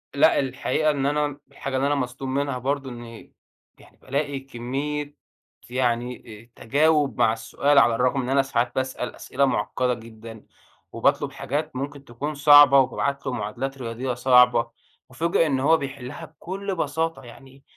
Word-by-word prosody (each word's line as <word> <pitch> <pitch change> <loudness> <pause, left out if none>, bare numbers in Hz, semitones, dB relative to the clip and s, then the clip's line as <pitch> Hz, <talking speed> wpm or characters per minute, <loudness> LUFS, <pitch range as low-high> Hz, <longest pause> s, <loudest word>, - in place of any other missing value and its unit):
لأ 150 +3 +4
الحقيقة 145 +3 0
إن 140 -2 -2
أنا، 145 0 0
الحاجة 135 -1 -5
اللي 135 +2 +1
أنا 145 - +1
مصدوم 130 0 -4
منها 140 -1 -1
برضه، 135 +1 -2
إني 120 -2 -11 0.5
يعني - - -20
بالاقي 140 0 -3
كمية، 140 +3 -5 0.5
يعني 125 -1 -1 0.4
أ - - -16
تجاوُب 145 +1 +2
مع 110 - +4
السؤال 140 +5 0
على 120 -4 +4
الرغم 125 +3 +1
إن 125 - -4
أنا 135 +1 +4
ساعات 120 -2 -1
باسأل 130 -1 -3
أسئلة 140 +2 0
مُعقّدة 125 +1 0
جدًا، 115 -1 -11 0.5
وباطلب 140 +4 +1
حاجات 140 +1 -4
ممكن 140 +1 -6
تكون 145 +6 -5
صعبة 145 -1 +8
وبابعت 140 +2 -1
له 130 - -2
معادلات 125 +6 -4
رياضيّة 125 +1 -4
صعبة، 125 -1 +4 0.4
أُُفاجأ 165 +4 +1
إن 135 -3 0
هو 160 +4 +4
بيحلّها 135 -3 -7
بكل 190 +5 -6
بساطة، 160 -2 -2
يعني 135 +3 -15
135 Hz, 150 wpm, -24 LUFS, 125-145 Hz, 0.5 s, صعبة